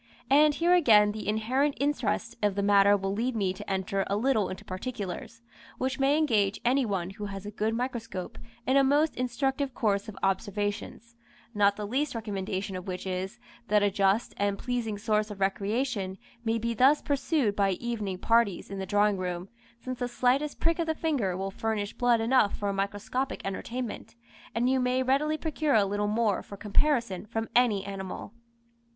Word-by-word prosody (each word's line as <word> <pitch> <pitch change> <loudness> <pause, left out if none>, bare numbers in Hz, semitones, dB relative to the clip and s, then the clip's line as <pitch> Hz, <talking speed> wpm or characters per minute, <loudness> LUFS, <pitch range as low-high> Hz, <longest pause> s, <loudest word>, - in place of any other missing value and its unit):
And 295 +1 +6
here 340 +3 +3
again 215 -12 +6
the 215 -1 -6
inherent 255 +7 +1
interest 290 +1 -1
of 205 -2 +1
the 200 - 0
matter 200 0 +5
will 195 0 -2
lead 235 +4 -1
me 195 -4 0
to 190 - -9
enter 195 0 -1
a 200 - 0
little 220 -3 +1
into 190 +3 -8
particulars, 205 +2 -6 0.3
which 260 +1 -2
may 275 +2 +3
engage 215 -10 +2
any 255 +1 +3
one 190 -3 -2
who 205 +1 -6
has 195 0 -6
a 205 - -5
good 215 +2 -1
microscope 230 -6 -4 0.3
in 260 +2 +3
a 275 - +6
most 290 +3 +3
instructive 265 +2 -1
course 205 -2 0
of 200 - -10
observations, 205 +4 -2 0.4
not 200 -1 +3
the 210 - -4
least 265 +6 -1
recommendation 200 -3 -3
of 185 +1 -6
which 180 0 -4
is, 190 +4 -3 0.3
that 210 0 +3
a 205 - +3
just 195 +3 +1
and 200 0 0
pleasing 235 -3 -2
source 215 0 0
of 205 -2 -8
recreation 200 0 -1 0.3
may 225 0 +1
be 235 +1 -1
thus 265 +6 +5
pursued 280 -6 +1
by 195 -1 +2
evening 210 -3 -3
parties 225 -2 +1
in 195 - -4
the 190 - -4
drawing 205 0 +3
room, 180 0 -4 0.3
since 255 0 -6
the 245 - -1
slightest 255 +4 +1
prick 330 +1 +1
of 335 - 0
the 320 - 0
finger 255 - -1
will 195 +1 -3
furnish 210 -1 -2
blood 245 -1 +3
enough 225 -2 +3
for 205 - -2
a - - -1
microscopic 205 +7 -2
entertainment, 230 +6 -5 0.4
and 235 +2 +2
you 260 0 +3
may 250 +1 +1
readily 290 +4 +1
procure 310 -3 0
a 210 -2 +5
little 205 +1 -1
more 215 -2 +1
for 200 - -10
comparison 215 -3 0
from 225 +1 -3
any 225 -6 +3
animal. 195 +1 -6
215 Hz, 185 wpm, -28 LUFS, 200-255 Hz, 0.4 s, And